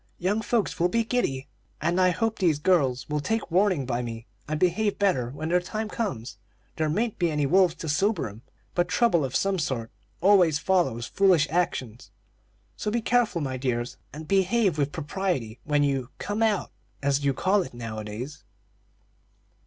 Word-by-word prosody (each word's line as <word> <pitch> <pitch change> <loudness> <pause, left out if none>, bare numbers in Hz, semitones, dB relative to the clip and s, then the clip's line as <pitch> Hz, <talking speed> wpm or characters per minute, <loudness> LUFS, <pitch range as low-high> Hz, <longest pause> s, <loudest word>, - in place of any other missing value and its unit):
Young 200 +5 0
folks 220 -1 -1
will 175 +1 +3
be 230 +5 +1
giddy, 180 - -1 0.3
and 170 +4 +1
I 185 - +5
hope 220 +5 -1
these 170 -6 +3
girls 145 -6 +2
will 150 0 -1
take 220 +5 -2
warning 185 -5 +2
by 120 -1 -1
me 115 -1 -6 0.2
and 155 0 -2
behave 205 +4 +1
better 155 -13 +1
when 155 +5 -5
their 180 +1 +4
time 215 +4 -4
comes. 125 - -4 0.4
There 155 -1 0
mayn't 215 +8 -1
be 175 -2 +2
any 150 -2 0
wolves 180 +2 +4
to 160 - -7
sober 195 - +1
'em, 105 +2 -11 0.3
but 175 0 +1
trouble 180 -4 +3
of 130 -1 -3
some 195 -1 +1
sort 125 -7 -2 0.3
always 180 -5 +5
follows 150 -10 +1
foolish 185 -7 +3
actions; 130 -9 -2 0.7
so - - -3
be 235 +3 0
careful, 240 -8 +2
my 130 -2 -2
dears, 125 -2 -2
and 155 +1 -9
behave 195 -3 +2
with 145 0 +1
propriety 150 - -3
when 145 -1 +2
you 135 -3 0
'come 205 +2 -3
out,' 215 -4 +1 0.3
as 140 0 +1
you 140 - +3
call 195 +2 +2
it 130 -8 -7
nowadays." 115 +4 -6
165 Hz, 175 wpm, -26 LUFS, 135-195 Hz, 0.7 s, I